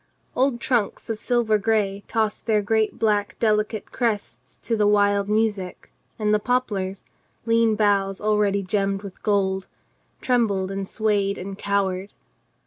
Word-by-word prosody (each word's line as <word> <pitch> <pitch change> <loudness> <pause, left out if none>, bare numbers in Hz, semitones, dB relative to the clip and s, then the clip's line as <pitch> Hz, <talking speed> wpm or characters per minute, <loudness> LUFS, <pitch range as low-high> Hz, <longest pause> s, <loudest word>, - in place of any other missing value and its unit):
Old 260 -2 +1
trunks 235 -3 -1
of 220 - -4
silver 230 -3 +1
gray 205 -2 0
tossed 220 -1 -1
their 215 -2 +2
great 220 +1 +1
black 210 -2 0
deli 215 -2 +3
cate 215 -1 -8
crests 225 -4 -3
to 230 - 0
the 210 -1 +2
wild 205 -1 +3
music, 210 -4 -1 0.3
and 210 -1 +1
the 210 - +3
poplars, 205 -6 -1 0.4
lean 230 -1 +3
boughs 200 -2 +1
already 210 -2 +1
gemmed 195 +1 -1
with 195 -2 -10
gold, 190 -2 0 0.5
trembled 205 -7 +1
and 195 0 -4
swayed 205 -2 0
and 195 +1 -6
cowered. 195 -1 -1
210 Hz, 140 wpm, -23 LUFS, 195-220 Hz, 0.5 s, deli